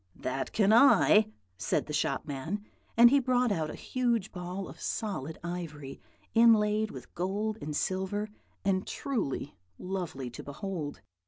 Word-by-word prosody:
"'That 130 +1 -3
can 210 0 +3
I,' 225 -3 +6 0.3
said 95 - 0
the 150 - -6
shop 150 - 0
man; 160 +9 -4 0.3
and 235 +1 +9
he 280 - +6
brought 250 -2 +2
out 160 -5 -1
a - - -6
huge 235 -5 -1
ball 180 +1 -5
of - - -12
solid 160 - -3
ivory, 155 -6 -6 0.3
inlaid 220 -2 +5
with 130 - -10
gold 205 +5 -2
and 150 0 -4
silver, 190 +5 -1 0.4
and 190 -1 +1
truly 225 - -3 0.2
lovely 175 -9 -4
to - - -8
behold. 155 0 -5
190 Hz, 145 wpm, -30 LUFS, 155-220 Hz, 0.4 s, and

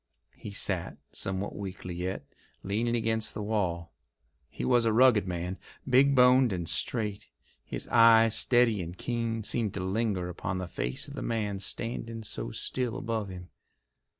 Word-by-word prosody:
He - - -9
sat, 95 -3 -1
somewhat 95 +1 -3
weakly 95 -2 -6
yet, 90 +2 -4 0.4
leaning 115 +5 0
against 110 -1 0
the 105 - -4
wall. 90 -6 -2 0.6
He - - -5
was 120 -2 +4
a 115 - +3
rugged 115 -4 +5
man, 90 +1 -4 0.3
big 135 +2 +5
boned 125 -1 +6
and 90 -3 -3
straight. 105 - 0 0.4
His - - -4
eyes, 115 -1 +6
steady 120 -5 +3
and 85 +1 -7
keen, 115 -1 -2
seemed 110 -1 -1
to - - -3
linger 95 -1 -1
upon 90 +1 -4
the 90 -1 -4
face 65 -7 -3
of - - -9
the - - -6
man 105 -4 -2
standing 115 +2 -3
so 105 - -4
still 125 - -3
above 110 -3 -3
him. 90 -1 -9
105 Hz, 155 wpm, -29 LUFS, 95-115 Hz, 0.6 s, boned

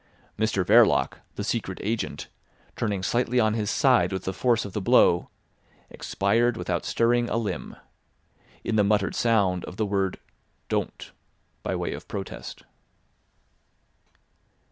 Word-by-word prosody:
Mr 105 -4 0
Verloc, 85 - +4 0.2
the 105 - -4
Secret 105 -4 -2
Agent, 110 +2 -3 0.5
turning 100 -4 -2
slightly 120 +3 +1
on 110 -2 +3
his 105 -2 -1
side 120 -10 +3
with 95 -1 -3
the 95 - -3
force 120 -1 +1
of 100 - -8
the 105 - -2
blow, 85 -1 +4 0.6
expired 115 +4 0
without 90 -1 -2
stirring 120 +7 +2
a - - 0
limb, 110 -3 -4 0.9
in 110 - -1
the 105 - +5
muttered 100 -1 +1
sound 100 -6 +2
of 90 - -9
the 110 - 0
word 95 -2 -1 0.5
"Don't" - - -3 0.5
by - - -2
way - - -2
of - - -9
protest. 100 -2 -7
105 Hz, 135 wpm, -26 LUFS, 95-115 Hz, 0.9 s, the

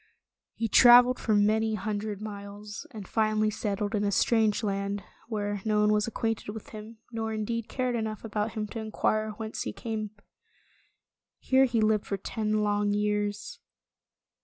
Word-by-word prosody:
He 230 - -1
traveled 245 +3 +7
for 215 - +1
many 215 +2 +2
hundred 210 0 -3
miles, 205 0 -8
and 205 -4 -9
finally 215 -1 +1
settled 205 0 -2
in 210 -1 +1
a 200 - +1
strange 220 +1 +2
land, 200 -1 -2 0.2
where 205 -3 -2
no 215 -1 +2
one 210 0 +4
was 210 +1 +1
acquainted 225 -2 -2
with 220 - -9
him, 215 +1 -10
nor 225 -1 -3
indeed 220 +1 -3
cared 255 -1 -1
enough 220 -2 -3
about 210 0 -2
him 215 -2 -2
to 225 - -5
inquire 215 0 0
whence 220 -1 -5
he - - -3
came. 220 -2 -4 1.3
Here 265 0 +3
he 235 -3 0
lived 215 -1 +2
for 200 - -2
ten 215 +2 -1
long 205 0 +1
years. 210 0 -2
215 Hz, 160 wpm, -28 LUFS, 205-225 Hz, 1.3 s, traveled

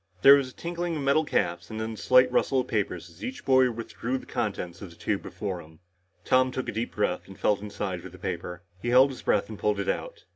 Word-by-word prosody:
There 140 - +11
was 140 -2 +3
a - - -17
tinkling 170 0 -3
of 145 - -3
metal 140 +3 +3
caps 85 - -1
and 110 - -5
then 110 0 -3
the 110 - -7
slight 125 +4 +5
rustle 130 +1 +2
of 125 - -8
paper 105 -4 0
as 85 +2 -12
each 125 +3 -6
boy 130 -1 +5
withdrew 120 +2 -4
the - - -10
contents 100 -7 -3
of 100 - -7
the 85 - -15
tube 100 +2 -2
before 95 -4 -5
him. 80 0 -16 0.5
Tom 130 0 +4
took 130 0 -4
a - - -1
deep 115 +2 -4
breath 105 -3 -1
and 95 -1 -12
felt 105 -2 +2
inside 100 -3 -4
for 95 - -9
the 90 - -13
paper. 90 0 -5 0.2
He - - -4
held 130 +3 +6
his 130 - -9
breath - - +1
and 110 -1 -9
pulled 105 -1 +1
it 100 - -2
out. - - -3
110 Hz, 255 wpm, -27 LUFS, 95-130 Hz, 0.5 s, There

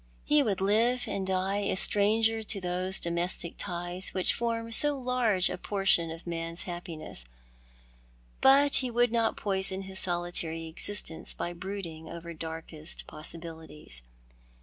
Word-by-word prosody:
He 300 0 +5
would 205 -8 0
live 230 +5 +3
and 190 -1 -2
die 190 +1 +1
a 200 - 0
stranger 220 +3 +3
to 205 -2 0
those 185 +1 0
domestic 170 0 -1
ties 175 0 -4
which 185 - +2
form 230 -1 -2
so 290 +5 +6
large 245 -7 +2
a - - -3
portion 195 -5 +2
of 165 +1 -7
man's 165 0 -3
happiness; 170 - -5 1.2
but 280 +2 +6
he 255 - 0
would 240 0 +3
not 230 -1 +2
poison 190 -1 -1
his 190 0 -3
solitary 175 -2 -1
existence 160 +1 -2
by 175 - -3
brooding 175 -3 -6
over 170 0 -7
darkest 160 0 -5
pos 155 - -6
sibilities. 160 - -5
185 Hz, 140 wpm, -30 LUFS, 170-220 Hz, 1.2 s, so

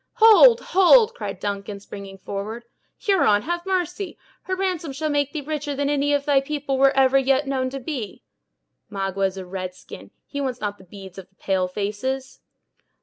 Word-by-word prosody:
"Hold, 460 +1 +7
hold!" 435 +5 +5
cried - - -6
Duncan, 200 0 -4
springing 195 -1 -10
forward; 205 +5 -6 0.3
"Huron, 215 - +2
have 345 +2 -3
mercy! 370 +1 -2 0.3
her 375 - -1
ransom 365 -6 -2
shall 305 +2 -2
make 285 -1 0
thee 310 - -4
richer 295 0 -4
than 285 +1 0
any 290 0 +1
of 285 -1 +1
thy 285 -2 +3
people 280 -1 -3
were 275 0 +6
ever 270 0 +5
yet 270 +1 +2
known 260 -2 -1
to 270 +1 -6
be." 250 - -6 0.7
"Magua 195 0 -1
is 190 0 -8
a 190 - -6
red 185 0 -6
skin; - - -12 0.2
he 285 - -5
wants 255 -3 -3
not 205 -1 -4
the 190 - -16
beads 190 0 -11
of 185 - -12
the 190 - -39
pale 190 -1 -1
faces." 250 +8 -4
270 Hz, 185 wpm, -23 LUFS, 200-305 Hz, 0.7 s, Hold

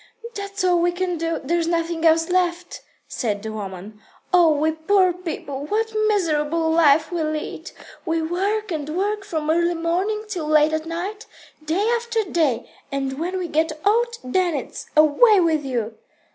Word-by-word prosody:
"That's 400 -1 -5
all 360 -1 +3
we 350 +1 +2
can 360 -1 -2
do. 330 0 -1
There's 335 +4 0
nothing 335 -1 -1
else 325 0 +4
left," 355 -1 -1 0.3
said 210 -4 -3
the 220 - -4
woman. 205 0 -8 0.3
"Oh, 350 -2 +6
we 305 +1 +1
poor 365 +3 +2
people, 315 -6 -6
what 445 +3 0
a 430 0 0
miserable 325 -5 +1
life 320 0 +4
we 345 -2 -1
lead. 310 +2 -4 0.3
We 325 0 0
work 385 +6 -1
and 305 -2 -3
work 410 +2 -1
from 315 -6 -2
early 345 +1 +2
morning 365 +6 -1
till 355 -8 -4
late 305 0 +4
at 315 +1 -2
night, 385 +6 -5 0.4
day 345 +8 0
after 465 -1 -1
day, 310 - 0 0.2
and 270 0 -3
when 360 +3 -2
we 365 -2 -3
get 315 0 -1
old, 470 +3 +2
then 345 +6 0
it's, - - -6
'Away 345 +9 +6
with 320 -4 +2
you!'" 235 -5 -3
335 Hz, 170 wpm, -22 LUFS, 310-370 Hz, 0.4 s, Oh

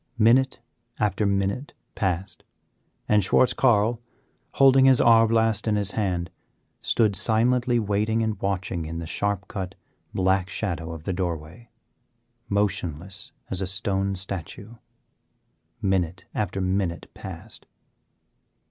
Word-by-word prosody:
Minute 120 +4 +4 0.4
after 105 0 +1
minute 100 +7 -1 0.2
passed, 95 -2 -2 0.6
and 105 -1 +3
Schwartz 125 +6 +3
Carl, 115 -2 +2 0.5
holding 135 -1 +6
his 130 -2 +6
arbelast 115 -1 +4
in 105 - +2
his 100 -1 0
hand, 90 -5 -2 0.5
stood 110 -4 +2
silently 120 +4 +2
waiting 110 +1 0
and 110 -3 -3
watching 95 -4 -2
in 80 +1 -5
the 85 - -5
sharp 100 +3 -2
cut, 95 -1 -5 0.4
black 95 0 +1
shadow 85 -5 -3
of 80 -2 -8
the 95 - -2
doorway, 90 +4 -5 0.8
motionless 95 -3 -1 0.2
as 95 - +4
a 95 - -1
stone 95 0 -1
statue. 95 +3 -5 1.1
Minute 95 -2 0
after 105 -2 -2
minute 95 -2 -1
passed. 95 +4 -9
100 Hz, 115 wpm, -25 LUFS, 95-110 Hz, 1.1 s, holding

